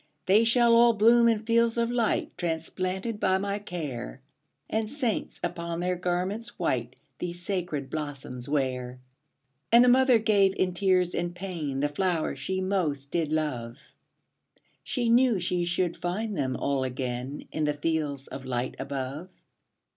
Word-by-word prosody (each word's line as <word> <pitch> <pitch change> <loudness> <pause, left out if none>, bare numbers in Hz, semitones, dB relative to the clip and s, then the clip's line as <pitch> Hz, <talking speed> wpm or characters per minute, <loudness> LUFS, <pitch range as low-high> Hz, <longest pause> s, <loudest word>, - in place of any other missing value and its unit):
``They 205 +4 +5
shall 235 0 +5
all 235 0 +6
bloom 235 +2 +5
in 220 -1 0
fields 230 0 +2
of 235 0 +1
light, 235 -3 0
Transplanted 185 +5 -3
by 190 -2 +3
my 200 +1 -2
care, 145 - -6 0.5
And 220 0 -1
saints, 255 -5 -2
upon 170 0 -3
their 180 +1 0
garments 180 +6 -2
white, 125 -7 -1 0.2
These 175 0 -5
sacred 175 -9 -3
blossoms 140 -4 -5
wear.'' 130 -3 -1 0.7
And 235 +1 +8
the - - +5
mother 255 -1 +6
gave, 205 -3 +3
in 185 -1 0
tears 185 -1 +2
and 175 0 -2
pain, 165 -7 -4
The 145 - +2
flowers 170 +1 -1
she 190 0 -2
most 155 -8 -1
did 160 -3 0
love; 130 -7 -2 1.1
She 240 -2 -1
knew 235 -2 +4
she 175 0 0
should 175 0 0
find 205 +5 -3
them 130 -4 -1
all 140 -1 0
again 130 +1 -4
In 155 - -1
the 150 0 0
fields 145 -3 -2
of 135 - -8
light 125 -1 -2
above. 140 +5 -4
175 Hz, 150 wpm, -27 LUFS, 145-210 Hz, 1.1 s, And